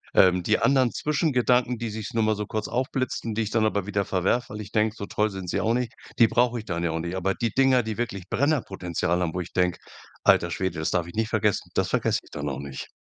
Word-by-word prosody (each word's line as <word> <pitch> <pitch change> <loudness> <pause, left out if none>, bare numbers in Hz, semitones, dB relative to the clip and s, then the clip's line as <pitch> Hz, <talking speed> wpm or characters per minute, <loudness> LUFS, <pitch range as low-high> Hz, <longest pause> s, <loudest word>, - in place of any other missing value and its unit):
Ähm, 90 -1 +5
die 105 +5 +2
anderen 130 -3 +3
Zwischengedanken, 125 -5 +1
die 115 -1 -3
sich's 110 +1 -6
nur 115 -1 +2
mal 110 0 +2
so 105 0 -3
kurz 110 0 -3
aufblitzen, 125 -3 -2
die 115 - +1
ich 105 - -4
dann 110 -1 +2
aber 100 -3 0
wieder 100 -1 0
verwerfe, 95 +5 0
weil 105 - -5
ich 105 0 -9
denke: 110 0 +1
„So 100 - -4
toll 105 +1 0
sind 95 -2 -7
sie - - -1
auch 115 +1 +2
nicht!”, 125 -2 -2 0.2
die 115 - +7
brauch 120 +1 +2
ich 110 - -6
dann 85 -3 -3
ja 85 - +1
auch 80 0 -2
nicht. 85 +2 -4
Aber 95 +1 0
die 115 -2 -1
Dinger, 130 -2 +4
die 110 -1 -4
wirklich 100 -6 -3
Brennerpotenzial 95 - 0
haben, 80 -2 -1
wo 90 - -1
ich 90 - -9
denk: 90 -1 +1 0.5
„Alter 85 - +4
Schwede, 95 -1 -2
das 80 - 0
darf 90 -2 +1
ich 85 - -10
nicht 110 0 -1
vergessen!”, 105 -2 0
das - - +1
vergesse - - +1
ich - - -20
dann 70 0 -3
auch 70 0 -4
nicht. 70 -1 -7
105 Hz, 260 wpm, -25 LUFS, 90-120 Hz, 0.5 s, die